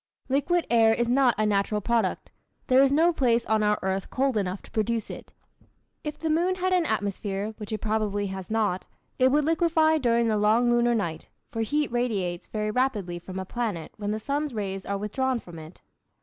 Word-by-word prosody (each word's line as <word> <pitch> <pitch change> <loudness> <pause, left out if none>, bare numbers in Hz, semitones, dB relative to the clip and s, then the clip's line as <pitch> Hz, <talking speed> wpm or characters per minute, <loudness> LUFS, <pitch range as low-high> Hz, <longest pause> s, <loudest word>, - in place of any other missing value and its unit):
Liquid 305 +6 +1
air 225 -1 +5
is 240 - 0
not 250 -1 +3
a 215 - +1
natural 210 0 +1
product. 225 -2 -1 0.3
There 255 +1 +5
is 275 0 +4
no 330 +4 +4
place 240 -6 +2
on 220 -1 +1
our 210 0 +2
earth 190 0 -2
cold 265 -1 0
enough 190 -2 -2
to - - -16
produce 225 0 -1
it. - - -10 0.7
If 300 -1 -5
the 325 - -4
moon 345 +4 +2
had 370 0 0
an 355 -3 +2
atmosphere 205 0 -2
(which 210 +1 -8
it 215 - -3
probably 210 -2 -1
has 190 -1 -6
not) 210 -4 0 0.3
it 260 0 +5
would 295 +1 +2
liquefy 320 -1 +3
during 235 -3 +2
the 215 -1 +1
long 220 +4 +3
lunar 240 0 +3
night, 165 -7 -3 0.2
for 225 - -2
heat 295 +5 0
radiates 205 -8 -1
very 215 -1 -2
rapidly 210 -8 -1
from 185 +2 -8
a 190 - -4
planet 210 -6 -3
when 205 -1 -4
the 215 +1 -1
sun's 285 +2 -2
rays 195 -2 -4
are 200 - -1
withdrawn 250 +5 -1
from 175 -6 -11
it. 155 +2 -12
225 Hz, 200 wpm, -26 LUFS, 205-265 Hz, 0.7 s, air